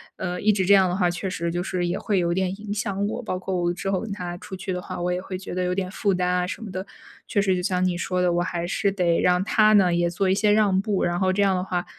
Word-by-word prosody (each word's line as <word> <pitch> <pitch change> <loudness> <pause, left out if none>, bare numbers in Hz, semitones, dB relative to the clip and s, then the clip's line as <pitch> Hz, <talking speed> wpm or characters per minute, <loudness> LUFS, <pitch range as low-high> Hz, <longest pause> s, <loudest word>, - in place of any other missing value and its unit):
呃， 180 -1 -4
一 215 - +1
直 190 -2 0
这 200 - +5
样 190 -2 +6
的 175 - -1
话 180 -2 +2
确 180 +2 -3
实 170 -2 -2
就 175 +1 -2
是 180 -1 -2
也 175 - -2
会 205 -4 0
有 170 -1 +1
点 190 0 0
影 205 -1 -4
响 205 -1 -2
我， 220 +4 -3
包 200 -6 -3
括 190 +1 -4
我 175 0 +1
之 195 +2 -3
后 190 - +1
跟 225 - -6
他 175 -3 -5
出 190 - -8
去 190 +1 -5
的 180 -1 -3
话， 180 -1 -6
我 180 +1 0
也 180 - -2
会 185 0 -6
觉 190 - -8
得 185 - -1
有 180 0 -1
点 185 -1 -2
负 200 0 0
担 180 0 0
啊 180 0 +1
什 205 - -6
么 210 - -7
的， 185 +1 -5 0.4
确 205 - +1
实 195 -2 +2
就 180 - -1
像 180 0 0
你 180 -1 +1
说 180 0 -1
的， 180 -1 +2
我 175 - +1
还 175 -1 -2
是 200 +3 0
得 175 -3 +1
让 180 +1 +3
他 215 +1 +4
呢， 185 -4 +5
也 175 0 +2
做 185 +2 0
一 - - +4
些 210 +1 +3
让 205 -3 +3
步， 205 -2 -1
然 175 0 0
后 185 0 +2
这 200 +1 +2
样 195 - +3
的 180 - 0
话， 180 -2 -2
185 Hz, 340 characters per minute, -24 LUFS, 180-195 Hz, 0.4 s, 样